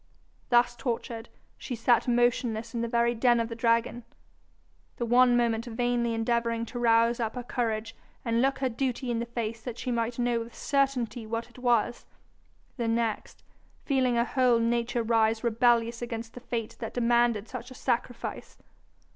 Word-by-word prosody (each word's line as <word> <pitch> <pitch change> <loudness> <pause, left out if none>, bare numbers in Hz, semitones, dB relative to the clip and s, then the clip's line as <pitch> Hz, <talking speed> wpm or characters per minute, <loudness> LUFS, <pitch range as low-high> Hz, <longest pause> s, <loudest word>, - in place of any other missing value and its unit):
Thus 240 0 +4
tortured, 235 -1 -4 0.3
she 250 - -5
sat 235 +2 +2
motionless 235 -2 +1
in 235 - -2
the 235 - -1
very 235 0 +2
den 240 0 +3
of 230 0 -1
the 230 - -5
dragon, 230 +1 +1 0.9
the 240 - -1
one 245 +1 +5
moment 230 -1 +1
vainly 240 0 0
endeavouring 230 0 0
to 245 - -3
rouse 230 0 +3
up 225 0 -2
her 250 - -4
courage 225 -2 -2 0.3
and 230 0 +1
look 270 +1 +2
her 265 -1 0
duty 250 +1 -2
in 230 - -1
the 235 - -3
face 230 -1 -4
that 240 0 -6
she 250 - -3
might 235 0 -1
know 240 -1 +1
with 230 +1 -8
certainty 260 -5 0
what 230 +2 -4
it 250 - -15
was; 240 -1 +1 0.7
the 235 -2 -1
next, 225 -1 -2 0.4
feeling 260 -3 +2
her 235 0 +2
whole 250 -2 +3
nature 235 +1 0
rise 225 0 +2
rebellious 235 0 +2
against 230 -1 -5
the - - -8
fate 235 -3 -4
that 225 - -6
demanded 235 -2 +2
such 250 0 -7
a 255 - -11
sacrifice. 245 -1 -3
235 Hz, 170 wpm, -28 LUFS, 230-245 Hz, 0.9 s, one